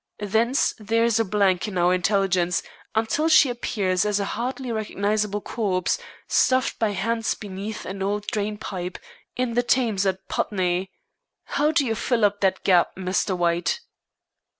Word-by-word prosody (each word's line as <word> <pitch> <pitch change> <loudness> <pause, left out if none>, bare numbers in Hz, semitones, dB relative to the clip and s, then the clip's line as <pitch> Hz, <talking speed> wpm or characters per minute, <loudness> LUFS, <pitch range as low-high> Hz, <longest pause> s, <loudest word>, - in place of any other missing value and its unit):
Thence 225 +6 +1
there 225 +2 +1
is 230 -1 +2
a - - +4
blank 195 -2 +1
in 195 -3 -4
our 175 +1 +3
intelligence 185 -2 +1 0.3
until 225 +9 +1
she 280 -5 +6
appears 200 -6 0
as 210 -1 +1
a 200 - -1
hardly 255 +1 -3
recognizable 210 -1 -1
corpse, 190 -6 -1 0.3
stuffed 255 0 +2
by 220 - +2
hands 225 +3 -1
beneath 205 +1 -6
an 195 +1 -6
old 205 +1 -1
drain 210 -1 -2
pipe 185 -4 -5 0.4
in 250 -2 -1
the 240 - +3
Thames 230 -6 +1
at 190 0 -2
Putney. 185 -1 -1 0.5
How 295 +1 +1
do 315 -3 +2
you 225 - 0
fill 230 0 +1
up 205 0 0
that 190 -1 +1
gap, 180 -3 +3
Mr. 185 0 -1
White?" 175 - 0
205 Hz, 155 wpm, -24 LUFS, 190-230 Hz, 0.5 s, she